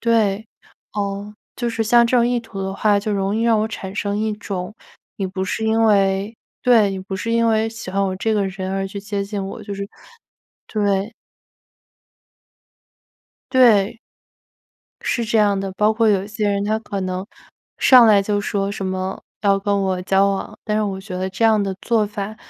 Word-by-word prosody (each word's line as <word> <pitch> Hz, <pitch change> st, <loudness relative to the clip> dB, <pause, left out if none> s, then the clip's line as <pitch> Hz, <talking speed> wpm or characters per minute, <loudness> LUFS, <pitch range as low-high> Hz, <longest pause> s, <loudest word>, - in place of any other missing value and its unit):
对， 220 Hz, -2 st, +1 dB, 0.5 s
呃， 205 Hz, 0 st, -4 dB, 0.2 s
就 240 Hz, -1 st, -1 dB
是 230 Hz, -1 st, -1 dB
像 235 Hz, +2 st, +5 dB
这 250 Hz, -, +2 dB
种 235 Hz, -, +4 dB
意 245 Hz, -, +1 dB
图 200 Hz, -4 st, -7 dB
的 190 Hz, 0 st, -3 dB
话， 205 Hz, 0 st, +3 dB
就 210 Hz, +1 st, -2 dB
容 195 Hz, +1 st, 0 dB
易 225 Hz, -, 0 dB
让 230 Hz, -2 st, +3 dB
我 220 Hz, -, 0 dB
产 190 Hz, -3 st, -7 dB
生 205 Hz, 0 st, -2 dB
一 220 Hz, 0 st, 0 dB
种， 200 Hz, -1 st, -5 dB, 0.4 s
你 195 Hz, -, -2 dB
不 190 Hz, 0 st, -4 dB
是 215 Hz, +3 st, -2 dB
因 225 Hz, +1 st, +2 dB
为 200 Hz, 0 st, +2 dB, 0.3 s
对， 225 Hz, -5 st, +5 dB
你 190 Hz, -, -4 dB
不 190 Hz, 0 st, -5 dB
是 230 Hz, +5 st, -3 dB
因 230 Hz, 0 st, +3 dB
为 220 Hz, 0 st, +2 dB
喜 225 Hz, -4 st, -8 dB
欢 195 Hz, +1 st, 0 dB
我 190 Hz, -, -1 dB
这 220 Hz, +3 st, 0 dB
个 200 Hz, -2 st, +1 dB
人， 190 Hz, 0 st, -5 dB
而 195 Hz, 0 st, -1 dB
去 200 Hz, +1 st, -7 dB
接 200 Hz, 0 st, -3 dB
近 200 Hz, -1 st, -4 dB
我， -, -, -7 dB
就 200 Hz, -1 st, -6 dB
是 200 Hz, 0 st, -5 dB, 0.8 s
对。 205 Hz, 0 st, 0 dB, 2.4 s
对。 230 Hz, -4 st, +4 dB, 1.0 s
是 235 Hz, -, -1 dB
这 225 Hz, 0 st, +1 dB
样 205 Hz, -2 st, +3 dB
的。 195 Hz, -1 st, -4 dB
包 210 Hz, +3 st, +2 dB
括 225 Hz, 0 st, +2 dB
有 195 Hz, -2 st, +2 dB
一 -, -, -10 dB
些 215 Hz, -1 st, -1 dB
人， 200 Hz, 0 st, 0 dB
他 215 Hz, +1 st, 0 dB
可 205 Hz, -3 st, -5 dB
能 185 Hz, 0 st, -3 dB, 0.5 s
上 250 Hz, -3 st, +7 dB
来 210 Hz, -2 st, +6 dB
就 205 Hz, 0 st, 0 dB
说 200 Hz, -1 st, -1 dB
什 200 Hz, -1 st, -5 dB
么 185 Hz, 0 st, -3 dB, 0.2 s
要 200 Hz, -1 st, +3 dB
跟 200 Hz, 0 st, 0 dB
我 185 Hz, -1 st, -1 dB
交 195 Hz, +1 st, +3 dB
往， 195 Hz, -1 st, -4 dB
但 210 Hz, -1 st, -1 dB
是 215 Hz, -, +1 dB
我 195 Hz, -2 st, -3 dB
觉 190 Hz, -2 st, -7 dB
得 185 Hz, +1 st, -2 dB
这 195 Hz, +4 st, -1 dB
样 220 Hz, -2 st, +4 dB
的 195 Hz, -1 st, -2 dB
做 225 Hz, -3 st, +1 dB
法， 205 Hz, +1 st, -5 dB
205 Hz, 215 characters per minute, -20 LUFS, 195-220 Hz, 2.4 s, 上